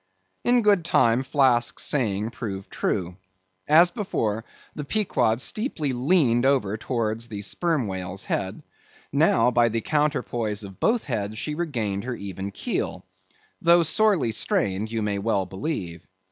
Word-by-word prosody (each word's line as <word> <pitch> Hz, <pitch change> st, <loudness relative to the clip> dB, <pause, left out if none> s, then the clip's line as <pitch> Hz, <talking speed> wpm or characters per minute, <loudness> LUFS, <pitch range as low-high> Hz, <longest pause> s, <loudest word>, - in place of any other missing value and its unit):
In 245 Hz, -1 st, +3 dB
good 200 Hz, -4 st, +4 dB
time, 120 Hz, -6 st, +3 dB
Flask's 130 Hz, -3 st, +2 dB
saying 110 Hz, -5 st, 0 dB
proved 100 Hz, -5 st, -6 dB
true. 90 Hz, 0 st, -2 dB, 0.5 s
As 170 Hz, +4 st, +6 dB
before, 115 Hz, -, -2 dB, 0.3 s
the 150 Hz, -, -5 dB
Pequod 130 Hz, -, +1 dB
steeply 155 Hz, -, -1 dB
leaned 125 Hz, -2 st, +2 dB
over 130 Hz, -7 st, +2 dB
towards 115 Hz, 0 st, -2 dB
the 105 Hz, -3 st, -6 dB
sperm 160 Hz, -, -1 dB
whale's 95 Hz, -1 st, -4 dB
head, 95 Hz, -1 st, -3 dB, 0.5 s
now, 125 Hz, -, +4 dB
by 120 Hz, -1 st, +3 dB
the 115 Hz, 0 st, -2 dB
counterpoise 120 Hz, -8 st, -1 dB
of 95 Hz, -1 st, -11 dB
both 235 Hz, 0 st, +2 dB
heads, 110 Hz, -5 st, -3 dB
she 150 Hz, -, -2 dB
regained 115 Hz, -11 st, -2 dB
her 125 Hz, -1 st, -3 dB
even 100 Hz, -1 st, -6 dB
keel; 100 Hz, -, -3 dB, 0.6 s
though 170 Hz, 0 st, +5 dB
sorely 170 Hz, -, +2 dB
strained, 105 Hz, -1 st, 0 dB
you 115 Hz, -1 st, -1 dB
may 100 Hz, -1 st, -1 dB
well 100 Hz, -2 st, 0 dB
believe. 95 Hz, -, -5 dB
115 Hz, 140 wpm, -25 LUFS, 100-150 Hz, 0.6 s, As